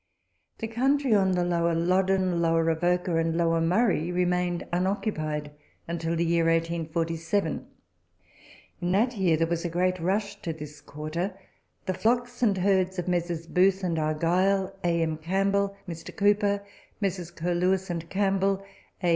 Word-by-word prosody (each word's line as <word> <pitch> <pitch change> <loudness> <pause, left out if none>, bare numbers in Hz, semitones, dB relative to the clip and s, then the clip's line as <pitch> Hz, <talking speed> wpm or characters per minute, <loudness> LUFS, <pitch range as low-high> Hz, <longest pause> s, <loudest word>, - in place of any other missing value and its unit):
The 225 - -4
country 265 +3 +2
on 190 -2 +3
the 180 -1 +1
Lower 170 -1 +1
Loddon, 185 +1 +2
Lower 165 -1 +2
Avoca, 175 +1 +1
and 165 0 0
Lower 165 -1 +2
Murray, 180 -1 +2
remained 180 -1 0
unoccupied 160 -5 -1 0.4
until 165 0 -2
the 170 +1 +1
year 170 0 +2
1847. 165 +2 -1 1.1
In 175 0 0
that 235 +5 +2
year 180 -6 +2
there 165 - +2
was 170 0 -2
a 175 - -1
great 180 +2 0
rush 200 +4 -1
to 165 - -3
this 150 -1 -10
quarter. 155 +6 -4 0.5
The 190 - 0
flocks 245 +5 0
arid 205 -5 +3
herds 190 0 +2
of 180 - -3
Messrs. 175 -2 -1
Booth 190 +3 +2
and 170 -3 0
Argyle, 185 +5 +1
A. 170 -1 +2
M. 160 -1 -1
Campbell, 195 +4 0
Mr. 165 -2 -7
Cowper, 205 0 +2 0.3
Messrs. 185 -4 -2
Curlewis 180 +2 0
and 170 -1 -5
Campbell, 195 0 +1 0.4
A. 175 - +3
180 Hz, 145 wpm, -27 LUFS, 165-195 Hz, 1.1 s, on